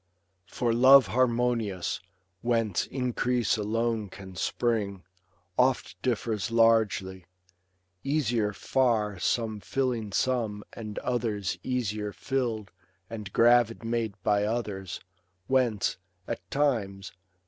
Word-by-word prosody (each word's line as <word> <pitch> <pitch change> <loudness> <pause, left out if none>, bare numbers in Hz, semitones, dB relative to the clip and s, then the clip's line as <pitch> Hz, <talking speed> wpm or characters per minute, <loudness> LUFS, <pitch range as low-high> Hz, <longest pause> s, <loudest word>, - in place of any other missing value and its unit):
For 120 -2 0
love 130 +2 +8
harmonious, 115 -4 0 0.4
whence 115 -5 0
increase 125 -2 0
alone 110 0 -1
Can 95 0 -11
spring, 100 -4 -1 0.6
oft 130 0 +2
differs 115 -3 -1
largely; 110 -5 +2 0.8
easier 120 -7 +1
far 110 -3 0
Some 110 +2 0
filling 120 -3 -2
some, 110 -3 0
and 110 -2 -7
others 105 -8 -1
easier 110 -4 -2
fill'd 120 -6 -2 0.4
And 105 -3 -6
gravid 120 0 +4
made 115 -3 -1
by 105 -1 +2
others; 105 -4 -3 0.4
whence, 125 -6 +1 0.3
at 90 - -5
times. 105 -9 0
115 Hz, 95 wpm, -28 LUFS, 105-120 Hz, 0.8 s, love